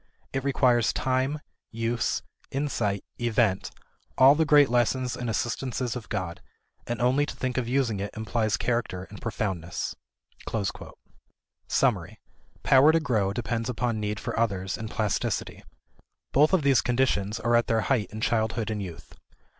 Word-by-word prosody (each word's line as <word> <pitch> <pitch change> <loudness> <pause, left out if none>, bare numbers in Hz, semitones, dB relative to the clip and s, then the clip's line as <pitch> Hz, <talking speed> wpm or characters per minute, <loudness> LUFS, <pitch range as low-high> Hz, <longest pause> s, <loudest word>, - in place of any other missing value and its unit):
It 135 -1 -1
requires 125 -4 +3
time, 130 +3 0 0.3
use, 115 +1 -1 0.3
insight, 120 -8 -1 0.2
event, 115 -5 +1 0.5
all 135 +2 +8
the 160 +2 +2
great 145 -1 +7
lessons 125 +1 +1
and 120 -1 -4
assistances 120 +2 -2
of 120 -4 -7
God; 90 -5 -3 0.5
and 120 0 -3
only 130 +4 +3
to - - -6
think 130 -1 -3
of 130 -2 -1
using 125 -5 +1
it 100 +1 -3
implies 110 -1 0
character 115 -7 -1
and 105 - -10
profoundness." 95 -7 -3 1.7
Summary. - - +1 0.4
Power 135 +3 +6
to 165 - +3
grow 110 -10 0
depends 115 +2 -2
upon 120 -2 -1
need 105 0 -2
for - - -4
others 95 -4 0
and 110 0 -6
plasticity. 110 -4 -2 0.7
Both 150 +3 +4
of 185 -5 +3
these 140 -2 +4
conditions 115 -4 0
are 120 +1 +2
at 120 - +3
their 115 -1 +2
height 110 -5 0
in 110 +1 -7
childhood 110 -1 0
and 105 -1 -3
youth. 90 -4 -9
120 Hz, 145 wpm, -27 LUFS, 105-130 Hz, 1.7 s, all